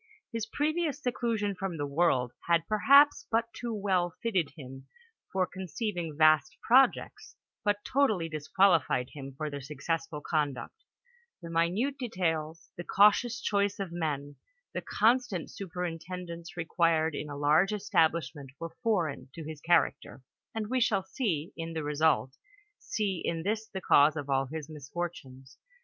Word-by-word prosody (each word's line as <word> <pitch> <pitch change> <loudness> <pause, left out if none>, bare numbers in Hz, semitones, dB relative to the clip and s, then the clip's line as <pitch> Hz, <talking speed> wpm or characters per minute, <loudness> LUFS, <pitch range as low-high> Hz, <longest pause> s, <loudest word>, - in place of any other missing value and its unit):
His 225 -1 -3
previous 305 +3 -1
seclu 245 -3 -1
sion 205 -1 -1
from 185 -2 -4
the 145 - -2
world 140 -4 +1 0.2
had, 170 -1 +2
perhaps, 280 +6 +5
but 230 0 0
too 240 -1 -5
well 185 -4 0
fitted 190 -10 +1
him 135 -1 -10 0.4
for 190 -1 +1
conceiving 180 -3 -4
vast 155 +1 +4
projects, 260 +2 +3 0.3
but 205 -1 0
totally 220 -12 +2
disqualified 155 -4 +2
him 135 -2 -8
for 155 - -3
their 145 -1 -5
successful 150 +3 -3
conduct; 145 -3 -2 0.7
the 170 -2 -9
minute 190 +13 0
details, 165 - -2
the 175 - -6
cautious 210 +5 +4
choice 200 -1 +1
of 195 -3 -4
men, 145 -4 -3 0.4
the - - -3
constant 225 -5 +1
superintendence 175 -1 -6
required 165 -1 +1
in 150 +1 -5
a 145 - -6
large 150 +7 +3
establishment, 160 -9 0
were 165 0 -7
foreign 175 - -1
*'» - - -16
his 155 -2 -7
char(»ctcr, 170 -5 +1 0.3
and 220 -1 -2
we 260 - +2
shall, 205 -5 +1 0.5
in 165 0 -5
the 160 -1 -3
result, 150 -3 +1 0.4
see 200 -4 -2
in 165 -1 -2
this 215 +3 -1
the 190 -2 -6
cause 145 -2 +5
of 145 -2 -4
all 135 0 +1
his 155 +1 -6
misfortunes. 145 -3 -7
170 Hz, 145 wpm, -30 LUFS, 150-205 Hz, 0.7 s, perhaps